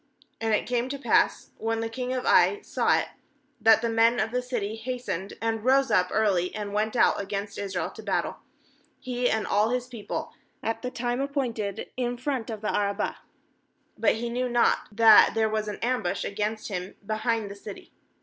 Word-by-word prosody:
14And 225 Hz, 0 st, 0 dB
it -, -, -5 dB
came 245 Hz, +1 st, -1 dB
to 280 Hz, -, -3 dB
pass, 280 Hz, -, +2 dB
when 225 Hz, 0 st, -1 dB
the 225 Hz, -, -1 dB
king 250 Hz, +2 st, -4 dB
of 255 Hz, -1 st, -2 dB
Ai 410 Hz, -, +5 dB
saw -, -, +2 dB
it, -, -, -2 dB, 0.5 s
that 225 Hz, 0 st, +5 dB
the -, -, +2 dB
men 230 Hz, +1 st, +3 dB
of 220 Hz, +1 st, 0 dB
the 250 Hz, +1 st, 0 dB
city 230 Hz, -4 st, -3 dB
hastened 225 Hz, -5 st, -4 dB
and 225 Hz, -1 st, -1 dB
rose 265 Hz, 0 st, +3 dB
up 180 Hz, -3 st, +3 dB
early 195 Hz, -5 st, +1 dB
and 205 Hz, -1 st, -4 dB
went 215 Hz, +3 st, 0 dB
out -, -, +3 dB
against 200 Hz, +1 st, -4 dB
Israel 195 Hz, -3 st, -3 dB
to -, -, -10 dB
battle, -, -, -1 dB, 0.6 s
he 250 Hz, -1 st, -1 dB
and 220 Hz, -1 st, 0 dB
all 210 Hz, +2 st, +2 dB
his 250 Hz, 0 st, -1 dB
peo 235 Hz, -5 st, -10 dB
ple, -, -, -4 dB, 0.3 s
at 225 Hz, 0 st, -2 dB
the 250 Hz, -, -3 dB
time 245 Hz, +1 st, -2 dB
appointed, 235 Hz, -8 st, -3 dB
in 245 Hz, -1 st, -1 dB
front 255 Hz, -2 st, -3 dB
of 220 Hz, -2 st, -5 dB
the 215 Hz, -, -1 dB
Arabah; 200 Hz, -1 st, -1 dB, 0.8 s
but -, -, +2 dB
he 235 Hz, +1 st, -3 dB
knew 250 Hz, +1 st, -1 dB
not 240 Hz, 0 st, +2 dB
that 220 Hz, 0 st, +7 dB
there 220 Hz, -1 st, +3 dB
was 215 Hz, 0 st, -1 dB
an 210 Hz, -, -4 dB
ambush 235 Hz, -7 st, 0 dB
against 215 Hz, +2 st, -3 dB
him 185 Hz, -1 st, -5 dB
be 215 Hz, -, -2 dB
hind 225 Hz, -2 st, -1 dB
the -, -, -8 dB
city. 200 Hz, 0 st, -10 dB
225 Hz, 200 wpm, -27 LUFS, 210-245 Hz, 0.8 s, that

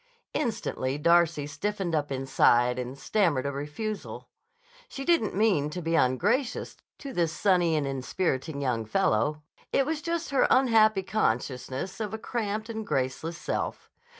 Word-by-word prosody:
Instantly 145 Hz, -, -2 dB
Darcy 170 Hz, -1 st, +3 dB
stiffened 180 Hz, +4 st, -3 dB
up 145 Hz, -2 st, 0 dB
inside 125 Hz, -2 st, +3 dB
and 125 Hz, +2 st, -5 dB
stammered 165 Hz, -5 st, +1 dB
a 140 Hz, -, 0 dB
refusal. 150 Hz, +10 st, -5 dB, 0.6 s
She 275 Hz, -, -6 dB
didn't 335 Hz, -, +2 dB
mean 190 Hz, -9 st, +2 dB
to 180 Hz, -, -5 dB
be 165 Hz, -1 st, -2 dB
ungracious 180 Hz, -, +1 dB, 0.2 s
to 275 Hz, -2 st, -8 dB
this 170 Hz, -5 st, +1 dB
sunny 175 Hz, -3 st, +2 dB
and 150 Hz, -2 st, 0 dB
inspiriting 135 Hz, +1 st, -2 dB
young 120 Hz, -4 st, 0 dB
fellow. 130 Hz, +7 st, +1 dB, 0.3 s
It 275 Hz, -, +3 dB
was 310 Hz, +1 st, -2 dB
just 335 Hz, -2 st, -3 dB
her 275 Hz, -, +4 dB
unhappy 220 Hz, -6 st, +4 dB
consciousness 130 Hz, -, -2 dB
of 220 Hz, 0 st, -3 dB
a -, -, -4 dB
cramped 220 Hz, -2 st, -3 dB
and 220 Hz, -1 st, -4 dB
graceless 135 Hz, +1 st, -2 dB
self. -, -, -4 dB
170 Hz, 145 wpm, -28 LUFS, 135-215 Hz, 0.6 s, her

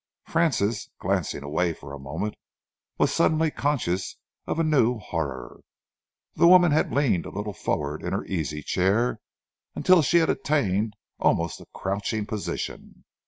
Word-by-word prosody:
Francis, 120 Hz, -10 st, 0 dB
glancing 70 Hz, -, -1 dB
away 85 Hz, +4 st, 0 dB
for 70 Hz, -2 st, -11 dB
a 70 Hz, -, -7 dB
moment, 70 Hz, +10 st, -4 dB, 0.6 s
was -, -, +2 dB
suddenly 160 Hz, 0 st, +2 dB
conscious 115 Hz, -13 st, -1 dB, 0.3 s
of -, -, -2 dB
a 165 Hz, -, +2 dB
new 130 Hz, -6 st, +3 dB
horror. 70 Hz, -, -5 dB, 0.7 s
The -, -, +4 dB
woman 180 Hz, -2 st, +7 dB
had 150 Hz, -, +2 dB
leaned 120 Hz, -, +1 dB
a -, -, -6 dB
little 105 Hz, +1 st, -4 dB
forward 75 Hz, -4 st, -2 dB
in -, -, -4 dB
her -, -, -2 dB
easy 75 Hz, -4 st, -3 dB
chair 105 Hz, -, +1 dB, 0.6 s
until 185 Hz, -2 st, +5 dB
she 170 Hz, +4 st, +3 dB
had 165 Hz, -1 st, +4 dB
attained 110 Hz, -8 st, 0 dB, 0.2 s
almost 85 Hz, 0 st, +1 dB
a -, -, -14 dB
crouching 100 Hz, +2 st, -2 dB
position. 105 Hz, -1 st, -5 dB
105 Hz, 145 wpm, -25 LUFS, -, 0.7 s, woman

